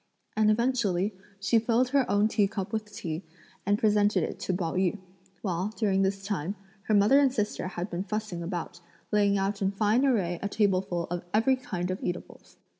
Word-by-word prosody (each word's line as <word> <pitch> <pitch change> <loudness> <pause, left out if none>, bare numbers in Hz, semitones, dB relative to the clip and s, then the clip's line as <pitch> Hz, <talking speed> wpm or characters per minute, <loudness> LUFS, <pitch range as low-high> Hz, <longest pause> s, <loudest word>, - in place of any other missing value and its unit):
And 215 0 +4
eventually, 215 -4 +1 0.3
she 215 +4 +3
filled 235 +3 +2
her 275 -1 +2
own 205 +1 +3
tea 210 -2 +2
cup 195 0 -5
with 215 -1 -3
tea 165 -5 -4 0.5
and 205 0 +3
presented 205 -3 +3
it - - -4
to - - -2
Pao 175 -3 -1
yü, 185 +2 +1 0.5
while, 185 -1 -1
during 195 -4 +2
this 195 0 0
time, 195 -2 -2 0.3
her 215 - +3
mother 210 +8 +6
and 275 -2 +4
sister 210 -6 -2
had 180 0 -4
been 175 +2 -3
fussing 210 -4 -3
about, 170 0 -5 0.3
laying 205 -1 +3
out 195 +1 -1
in 195 - +2
fine 215 +5 +2
array 190 -11 +1
a 200 - -2
tableful 190 -5 +1
of 175 -1 -2
every 260 +5 +4
kind 185 -8 -4
of 185 - -4
eatables. 175 0 -6
200 Hz, 190 wpm, -28 LUFS, 185-215 Hz, 0.5 s, mother